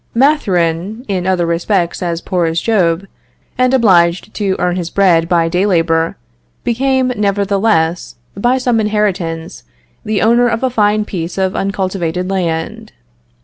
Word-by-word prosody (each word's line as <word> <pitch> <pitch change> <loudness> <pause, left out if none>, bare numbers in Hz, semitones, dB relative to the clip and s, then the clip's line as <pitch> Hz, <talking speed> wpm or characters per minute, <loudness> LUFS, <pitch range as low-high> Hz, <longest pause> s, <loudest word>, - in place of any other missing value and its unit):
Mathurin, 210 - +1
in 185 -2 -2
other 185 -2 +1
respects 170 +2 -1
as 170 -1 -2
poor 175 -3 -1
as 165 +1 0
Job, 185 -4 +1 0.5
and 255 0 +2
obliged 185 -6 +3
to 195 -3 -1
earn 180 0 0
his 175 -2 -3
bread 175 -4 +2
by 170 -2 +2
day 180 +4 0
labor, 165 -3 +1 0.5
became, 260 +2 +1
nevertheless, 200 -4 0 0.2
by 240 +6 +1
some 245 -3 +1
inheritance, 190 -6 -2 0.4
the 215 -3 -1
owner 235 +2 +4
of 230 +1 -2
a 260 - +1
fine 210 -2 +1
piece 170 -3 -5
of 190 0 0
uncultivated 185 -2 -2
land. 165 -4 -3
190 Hz, 140 wpm, -15 LUFS, 170-215 Hz, 0.5 s, owner